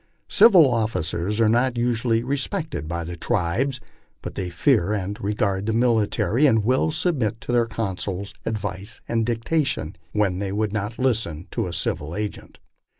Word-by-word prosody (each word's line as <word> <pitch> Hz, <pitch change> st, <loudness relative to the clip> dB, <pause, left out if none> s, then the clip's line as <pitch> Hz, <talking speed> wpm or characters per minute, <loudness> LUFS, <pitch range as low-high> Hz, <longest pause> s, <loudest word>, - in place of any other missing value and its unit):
Civil 185 Hz, -10 st, +7 dB
officers 105 Hz, -4 st, 0 dB
are 115 Hz, -, +4 dB
not 120 Hz, +2 st, +2 dB
usually 120 Hz, -1 st, +1 dB
respected 140 Hz, -, -3 dB
by 85 Hz, +1 st, -3 dB
the 85 Hz, +1 st, -6 dB
tribes, 115 Hz, +8 st, -1 dB, 0.4 s
but -, -, -5 dB
they 95 Hz, -2 st, -3 dB
fear 85 Hz, +3 st, +2 dB
and 100 Hz, +2 st, -4 dB
regard 100 Hz, -1 st, -1 dB
the 110 Hz, -, +1 dB
military, 115 Hz, +3 st, +2 dB
and 110 Hz, -5 st, +3 dB
will 130 Hz, +7 st, +2 dB
submit 145 Hz, -, 0 dB
to -, -, -5 dB
their 120 Hz, -1 st, +3 dB
counsels, 100 Hz, -3 st, -4 dB
advice, 105 Hz, -2 st, -4 dB
and 115 Hz, -1 st, 0 dB
dicta 120 Hz, +7 st, +1 dB
tion, 80 Hz, -, -3 dB, 0.2 s
when 100 Hz, -4 st, 0 dB
they 100 Hz, -1 st, -2 dB
would 105 Hz, 0 st, -1 dB
not 105 Hz, +1 st, -3 dB
listen 110 Hz, -11 st, -1 dB
to -, -, -2 dB
a -, -, -5 dB
civil 80 Hz, -1 st, -2 dB
agent." 105 Hz, 0 st, -5 dB
110 Hz, 160 wpm, -23 LUFS, 95-120 Hz, 0.4 s, Civil